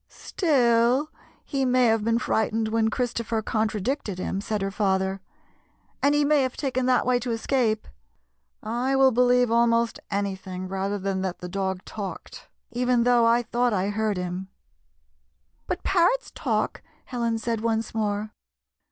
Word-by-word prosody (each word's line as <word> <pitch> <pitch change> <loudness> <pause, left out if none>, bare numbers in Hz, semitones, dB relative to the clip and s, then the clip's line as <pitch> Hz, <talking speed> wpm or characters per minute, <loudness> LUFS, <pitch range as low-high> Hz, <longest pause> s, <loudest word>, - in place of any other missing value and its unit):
" - - -50
Still, 255 - +2 0.3
he 275 -2 -1
may 255 -1 +3
have 225 -2 +2
been 230 +1 +2
frightened 220 -1 0
when 220 0 +2
Christopher 230 -1 -2
contradicted 215 0 -1
him," 190 +1 -3
said 215 0 -2
her 195 - -2
father, 190 -1 0 0.8
"and 285 +1 +3
he 295 0 +3
may 295 -1 +4
have 260 -1 -2
taken 260 -3 -1
that 255 -1 +3
way 250 0 +2
to 245 +1 -5
escape. 225 -1 0 0.8
I 240 +5 -1
will 270 -1 +5
believe 245 0 +3
almost 235 0 +2
anything 190 -2 -3
rather 195 +2 -2
than 195 -1 -2
that 190 -1 -3
the 180 - -7
dog 190 0 -3
talked, 205 -3 -7 0.2
even 245 0 +2
though 240 -1 +4
I 235 +1 +3
thought 240 +1 0
I 195 0 0
heard 210 -1 -1
him" 180 +1 -4 0.6
" - - -45
But - - -3
parrots 385 +7 +2
talk," - - -1 0.2
Helen 235 -2 -1
said 225 0 -2
once 225 -1 -1
more. 210 -1 -2
230 Hz, 155 wpm, -25 LUFS, 205-250 Hz, 0.8 s, will